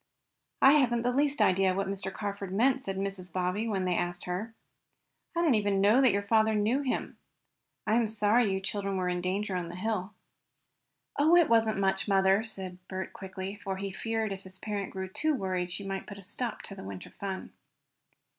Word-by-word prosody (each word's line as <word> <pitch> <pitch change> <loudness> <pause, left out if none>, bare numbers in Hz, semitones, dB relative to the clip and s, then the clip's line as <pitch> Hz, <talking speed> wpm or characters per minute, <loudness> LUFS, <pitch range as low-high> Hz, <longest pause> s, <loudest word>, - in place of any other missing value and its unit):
"I 270 - +9
haven't 240 -3 +2
the 245 - +2
least 280 -2 +2
idea 190 -1 +3
what 195 +1 0
Mr. 195 0 -3
Carford 200 -2 -5
meant," 255 +7 +3
said 195 -5 -3
Mrs. 195 -2 -3
Bobbsey, 185 +5 -1
when 195 -4 -1
they 180 - +1
had 175 - +1
asked 175 0 -6
her. 205 +6 -4 0.8
"I 340 - +2
did 330 - +3
not 255 - +5
even 205 -2 +1
know 210 +7 +5
that 260 -4 +6
your 200 +1 0
father 220 +1 +3
knew 220 +7 +2
him. 265 -3 -3 0.7
I 220 - +3
am 235 -2 +2
sorry 215 +1 +3
you 190 - 0
children 195 0 -2
were 185 -1 0
in 180 0 -1
danger 190 +2 -1
on 175 -2 -3
the 175 - -7
hill." 205 0 -2 1.0
"Oh, 315 +4 +6
it 345 -2 +5
wasn't 225 -2 +3
much, 195 0 +1
mother," 195 +1 +4
said 190 -5 -4
Bert 190 0 -5
quickly, 190 0 -6
for 200 -2 -5
he 195 0 -4
feared 220 +1 -2
if 190 - -8
his 190 -1 -10
parent 200 -1 -3
grew 190 0 -5
too 300 +11 0
worried 185 -5 -2
she 195 +3 -3
might 195 0 -4
put 200 - -8
a 200 - -11
stop 225 +4 -4
to - - -7
the - - -9
winter 95 -1 -8
fun. 195 -1 -6
200 Hz, 210 wpm, -30 LUFS, 190-220 Hz, 1.0 s, I